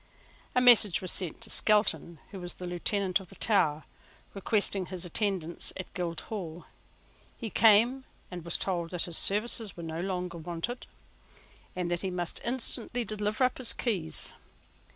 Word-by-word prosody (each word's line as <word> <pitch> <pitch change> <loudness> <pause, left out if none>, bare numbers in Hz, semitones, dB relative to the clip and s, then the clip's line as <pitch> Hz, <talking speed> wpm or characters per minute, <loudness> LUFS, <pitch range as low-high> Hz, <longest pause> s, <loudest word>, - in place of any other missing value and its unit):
A 250 - +4
message 235 -7 +6
was 185 - -2
sent 180 +1 -1
to 225 - -2
Skelton, 190 -6 +2
who 195 - -7
was 175 -1 -6
Lieutenant 185 +2 0
of 190 - -12
the - - -5
Tower, 160 -9 +1 0.5
requesting 200 -2 0
his 185 -1 -5
attendance 175 -2 0
at 185 - -8
Guildhall. 175 0 -5 0.7
He 225 -4 -5
came, 230 +4 +5 0.3
and 175 -2 -6
was 170 0 -2
told 175 -3 -2
that 180 -1 -1
his 170 -2 0
services 210 0 +1
were 170 - -7
no 165 0 -4
longer 180 -2 -3
wanted, 175 +9 -5 0.9
and 180 -1 -2
that 175 - -1
he 190 - -2
must 175 -2 -3
instantly 245 0 +1
deliver 215 +3 -1
up 255 +1 +1
his 255 - +3
keys. 200 - -2
185 Hz, 155 wpm, -29 LUFS, 175-215 Hz, 0.9 s, message